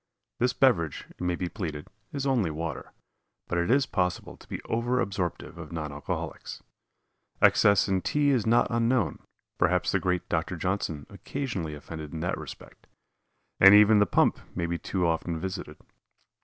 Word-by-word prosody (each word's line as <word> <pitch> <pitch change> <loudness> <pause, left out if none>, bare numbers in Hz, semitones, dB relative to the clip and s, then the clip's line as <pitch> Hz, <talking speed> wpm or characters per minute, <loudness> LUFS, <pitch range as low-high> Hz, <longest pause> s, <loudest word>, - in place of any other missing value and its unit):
This 125 +1 +2
beverage, 85 - +2
it - - -17
may 90 -1 0
be 90 - -3
pleaded, 80 -7 -5 0.3
is 140 -1 -3
only 125 -10 +2
water, 80 -2 -5 0.6
but 85 - -1
it 85 - 0
is 135 +2 +4
possible 90 -6 -2
to - - -18
be - - -4
over 120 +2 0
absorptive 90 -4 -3
of 80 -3 -9
non 75 -3 -4
alcoholics. 70 +1 -6 0.8
Excess 100 -1 +5
in 95 -2 +1
tea 145 +5 +2
is 120 -5 +1
not 120 +2 +4
unknown 115 -1 +1 0.4
perhaps - - +2
the - - +2
great 90 -1 -1
Dr. 80 +2 -1
Johnson 85 -4 -2
occasionally 95 - -4
offended 75 +1 -8
in 80 - -4
that 90 - -2
respect - - -11 0.7
and 95 +1 +9
even 105 0 +7
the 105 - +4
pump - - +2 0.2
may 85 - -1
be 85 0 -2
too 90 -2 -1
often 85 0 -1
visited. 95 +3 -5
90 Hz, 165 wpm, -27 LUFS, 85-115 Hz, 0.8 s, and